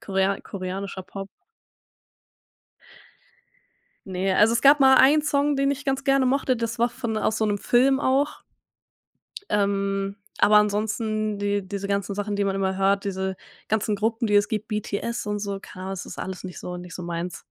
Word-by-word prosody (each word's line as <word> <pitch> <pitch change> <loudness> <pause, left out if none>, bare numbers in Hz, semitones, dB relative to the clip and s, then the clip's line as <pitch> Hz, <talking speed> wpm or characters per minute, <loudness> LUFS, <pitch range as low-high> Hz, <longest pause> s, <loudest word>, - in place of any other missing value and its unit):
Korea 195 0 0
koreanischer 190 0 -5
Pop. 195 +1 -8 2.8
Ne, 185 +1 -1
also, 220 +2 +5
es 235 - +1
gab 285 +1 +7
mal 265 -1 +7
1 290 +3 +6
Song, 290 -1 +1
den 275 0 +2
ich 285 0 -7
ganz 270 0 -1
gerne 275 -1 +3
mochte. 260 -1 +1
Das 230 0 -3
war 235 - +3
von 235 -2 -4
aus 215 - 0
so 220 - +1
'nem 205 -1 0
Film 265 +5 +3
auch. 280 +1 0 1.1
Ähm, 200 -1 0 0.2
aber 210 0 +5
ansonsten, 215 0 0
die 205 -1 -1
diese 200 0 -5
ganzen 200 0 -1
Sachen, 205 0 -3
die 200 - +1
man 195 0 0
immer 190 -1 -1
hört, 195 +1 +2
diese 190 -1 -3 0.3
ganzen 215 -1 0
Gruppen, 225 +2 0
die 210 - 0
es 205 0 +4
gibt, 215 0 -3
BTS 210 +1 -3
und 210 0 -1
so, 200 -1 -4
keine 185 -1 -10
Ahnung, 190 - -4
das 190 - -6
ist - - -9
alles 190 -1 -6
nicht 180 -1 -7
so 180 - -6
nicht 180 0 -9
so 180 - -6
meins. 170 +1 -5
205 Hz, 180 wpm, -24 LUFS, 195-235 Hz, 2.8 s, gab